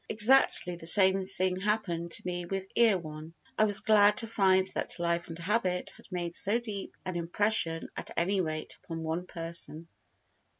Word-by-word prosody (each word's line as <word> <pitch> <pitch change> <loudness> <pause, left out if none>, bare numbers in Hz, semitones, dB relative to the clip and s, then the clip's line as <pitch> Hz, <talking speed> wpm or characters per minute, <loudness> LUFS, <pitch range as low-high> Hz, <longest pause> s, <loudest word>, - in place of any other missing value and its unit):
Exactly 215 -5 +4
the 165 - -4
same 190 0 +4
thing 185 -1 -2
happened 185 -5 -2
to - - -3
me 175 -1 -3
with 190 +1 -4
Erewhon. 165 -8 0 0.2
I 215 - +3
was 205 -2 +4
glad 210 -1 +4
to 230 - +1
find 190 -3 +2
that - - -4
Life 170 0 -1
and 165 -1 -8
Habit 185 0 -1
had - - -18
made 175 -2 -4
so 205 +4 +3
deep 210 -5 -7
an 185 - -4
impression 170 -1 0
at - - -6
any 190 +3 +1
rate 155 -2 -5
upon 165 -1 -6
one 165 +3 -4
person. 165 -1 -4
185 Hz, 170 wpm, -29 LUFS, 170-205 Hz, 0.2 s, Exactly